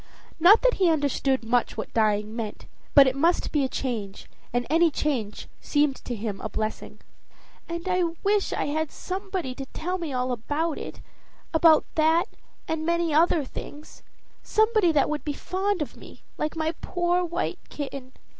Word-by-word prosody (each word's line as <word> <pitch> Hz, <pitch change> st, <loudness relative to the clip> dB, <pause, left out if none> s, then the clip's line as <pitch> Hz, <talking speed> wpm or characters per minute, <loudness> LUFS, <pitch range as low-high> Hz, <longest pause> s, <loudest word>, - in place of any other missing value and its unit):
Not 380 Hz, +9 st, +7 dB
that -, -, +3 dB
he 360 Hz, -, +5 dB
understood 280 Hz, -4 st, +1 dB
much 240 Hz, +1 st, 0 dB
what 220 Hz, -, -5 dB
dying 215 Hz, -1 st, +1 dB
meant, 220 Hz, -3 st, -5 dB, 0.3 s
but 280 Hz, -2 st, +10 dB
it 260 Hz, 0 st, +1 dB
must 335 Hz, +5 st, +2 dB
be 295 Hz, -2 st, +2 dB
a 265 Hz, -, 0 dB
change, 220 Hz, -9 st, -4 dB, 0.2 s
and 245 Hz, 0 st, 0 dB
any 330 Hz, +3 st, +4 dB
change 265 Hz, -9 st, -2 dB
seemed 290 Hz, -2 st, +1 dB
to 245 Hz, -, -3 dB
him 210 Hz, -2 st, -4 dB
a 220 Hz, -, -4 dB
blessing. 215 Hz, +1 st, -4 dB, 0.7 s
"And 340 Hz, +2 st, -4 dB
I 365 Hz, -1 st, +2 dB, 0.2 s
wish 410 Hz, 0 st, +2 dB
I -, -, -1 dB
had 310 Hz, +1 st, -1 dB
somebody 375 Hz, -7 st, -4 dB
to 270 Hz, +1 st, -7 dB
tell 365 Hz, +3 st, -3 dB
me 330 Hz, -4 st, -4 dB
all 255 Hz, 0 st, -1 dB
about 290 Hz, +7 st, -2 dB
it -, -, -8 dB, 0.5 s
about 320 Hz, -1 st, +6 dB
that 320 Hz, +2 st, +3 dB, 0.4 s
and 320 Hz, -1 st, -2 dB
many 340 Hz, -1 st, +1 dB
other 315 Hz, -1 st, +3 dB
things; 295 Hz, +3 st, -9 dB, 0.4 s
somebody 435 Hz, -5 st, +3 dB
that 295 Hz, -3 st, +3 dB
would 300 Hz, 0 st, -3 dB
be 295 Hz, -, -2 dB
fond 375 Hz, +2 st, -1 dB
of -, -, -10 dB
me, -, -, -14 dB
like 305 Hz, -, -3 dB
my 320 Hz, 0 st, 0 dB
poor 350 Hz, 0 st, 0 dB
white 345 Hz, +1 st, -2 dB
kitten." 275 Hz, -2 st, -6 dB
305 Hz, 170 wpm, -26 LUFS, 255-345 Hz, 0.7 s, but